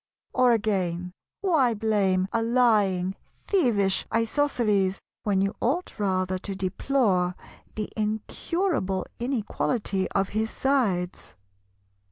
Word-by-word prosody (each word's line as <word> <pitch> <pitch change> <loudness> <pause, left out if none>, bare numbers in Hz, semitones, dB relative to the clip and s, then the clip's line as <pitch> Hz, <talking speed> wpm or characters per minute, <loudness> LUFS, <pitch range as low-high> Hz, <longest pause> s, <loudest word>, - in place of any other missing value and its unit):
Or 255 -1 +4
again, 180 -5 0 0.3
why 300 - +3
blame 200 -4 +1
a 230 - +2
lying, 210 -6 +2 0.3
thievish 220 - +2
Isosceles, 225 -5 +1 0.2
when 200 -2 +1
you 195 +1 0
ought 285 +2 -1
rather 185 -2 0
to 195 +1 -5
deplore 190 -2 +1 0.4
the 215 -1 -2
incurable 215 - -1
inequality 225 -5 -1
of 195 0 +1
his 220 +1 -1
sides? 210 -12 -1
210 Hz, 100 wpm, -26 LUFS, 190-245 Hz, 0.4 s, Or